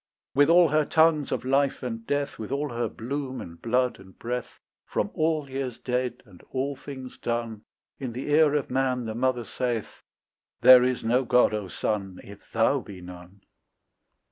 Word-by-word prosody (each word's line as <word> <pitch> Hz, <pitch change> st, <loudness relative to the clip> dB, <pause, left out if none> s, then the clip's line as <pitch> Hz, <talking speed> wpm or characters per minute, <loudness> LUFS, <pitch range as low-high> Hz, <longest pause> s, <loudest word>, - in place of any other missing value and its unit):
With 145 Hz, +2 st, +4 dB
all 170 Hz, -1 st, +6 dB
her 155 Hz, +1 st, +3 dB
tongues 160 Hz, -1 st, +3 dB
of -, -, -2 dB
life 135 Hz, +1 st, +1 dB
and 115 Hz, -2 st, -5 dB
death, 145 Hz, 0 st, -1 dB
With 110 Hz, +2 st, -6 dB
all 145 Hz, +2 st, -1 dB
her 120 Hz, -2 st, -2 dB
bloom 130 Hz, +4 st, -4 dB
and 85 Hz, 0 st, -10 dB
blood 125 Hz, 0 st, +1 dB
and 95 Hz, 0 st, -16 dB
breath, 125 Hz, +1 st, -5 dB, 0.3 s
From -, -, -1 dB
all 155 Hz, -2 st, 0 dB
years 130 Hz, -3 st, -4 dB
dead 125 Hz, -1 st, -2 dB
and 95 Hz, -5 st, -17 dB
all 135 Hz, +2 st, -2 dB
things 130 Hz, -2 st, -9 dB
done, 115 Hz, -2 st, -3 dB, 0.3 s
In 130 Hz, -4 st, -4 dB
the 130 Hz, +4 st, -4 dB
ear 150 Hz, -1 st, +5 dB
of 145 Hz, -, -1 dB
man 130 Hz, -2 st, 0 dB
the 110 Hz, -, -3 dB
mother 125 Hz, +1 st, 0 dB
saith, 120 Hz, -1 st, -3 dB, 0.6 s
"There 130 Hz, -1 st, +9 dB
is 125 Hz, 0 st, 0 dB
no 120 Hz, +3 st, +2 dB
God, 125 Hz, -1 st, +4 dB
O 105 Hz, -2 st, -3 dB
son, 95 Hz, 0 st, -3 dB
If 100 Hz, 0 st, -14 dB
thou 115 Hz, +5 st, +3 dB
be 100 Hz, -6 st, -10 dB
none." 90 Hz, +2 st, -12 dB
125 Hz, 175 wpm, -26 LUFS, 115-140 Hz, 0.6 s, There